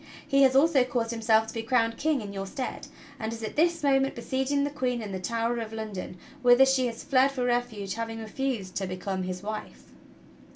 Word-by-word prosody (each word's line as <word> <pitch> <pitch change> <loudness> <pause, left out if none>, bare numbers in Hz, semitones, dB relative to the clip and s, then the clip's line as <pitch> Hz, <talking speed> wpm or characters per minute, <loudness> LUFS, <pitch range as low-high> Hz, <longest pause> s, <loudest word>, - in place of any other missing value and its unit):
He 275 -2 +3
has 265 -1 +5
also 280 -1 +5
caused 240 -2 -2
himself 220 -1 +3
to 220 - -8
be 225 - -3
crowned 230 -1 +1
King 300 -1 0
in 200 -1 -7
your 195 0 -4
stead, 260 +4 -5 0.3
and 220 0 -3
is 230 0 -7
at 215 - -5
this 330 0 +2
moment 270 -1 +2
besieging 265 +4 0
the 285 - -1
Queen 255 -4 -1
in 215 -3 -6
the 190 - -3
Tower 230 +4 -1
of 225 -1 -5
London, 215 -5 -6 0.2
whither 245 +1 +7
she 265 -1 +2
has 230 -1 -6
fled 275 -1 +3
for 255 -2 -2
refuge, 240 -5 -1
having 225 0 -4
refused 220 -3 -3
to 195 - -2
become 185 +1 -3
his 185 0 -4
wife." 215 +1 -7
235 Hz, 210 wpm, -27 LUFS, 220-265 Hz, 0.3 s, whither